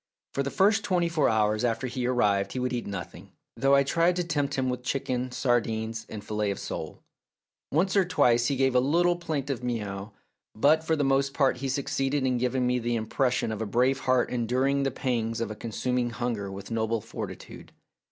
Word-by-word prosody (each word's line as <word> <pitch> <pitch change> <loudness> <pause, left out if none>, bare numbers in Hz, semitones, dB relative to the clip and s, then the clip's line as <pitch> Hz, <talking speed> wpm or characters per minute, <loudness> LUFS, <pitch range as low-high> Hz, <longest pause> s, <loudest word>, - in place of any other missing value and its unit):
For 140 - 0
the 140 - -1
first 205 +7 +3
twenty 180 -3 +1
four 165 -3 +2
hours 110 0 +1
after 120 +2 0
he 125 0 -2
arrived 100 -6 +1
he - - -4
would 125 0 -1
eat 120 - -3
nothing, 100 -3 -7 0.2
though 135 +1 +4
I 140 - +5
tried 170 +6 +2
to 180 - 0
tempt 145 -4 -1
him 130 -1 0
with 125 0 -2
chicken, 125 -1 -2
sardines, 115 -3 -1
and 105 -2 -7
fillet 105 -1 -1
of 100 - -2
sole. - - -6 0.7
Once 180 +7 +1
or 195 - +5
twice 120 -9 +3
he 140 - +1
gave 135 0 +2
a 125 - +5
little 170 +7 +3
plaintive 140 -7 -3
mew, 105 -4 -3 0.5
but 150 +7 +4
for 160 0 +1
the 145 - 0
most 135 0 +1
part 135 -4 +2
he 135 +1 -3
succeeded 135 0 -1
in 125 -2 +1
giving 125 +1 0
me 125 0 +1
the 120 0 -1
impression 120 +2 0
of 110 0 -4
a 110 - -2
brave 125 +6 +2
heart 130 -2 +1
enduring 130 +4 +1
the 135 - +1
pangs 120 -3 -2
of 115 -2 -2
a - - -5
con 115 +2 -7
suming 125 +2 -1
hunger 115 -4 -3
with 100 +3 -8
noble 115 0 0
fortitude. - - -8
125 Hz, 205 wpm, -27 LUFS, 115-140 Hz, 0.7 s, I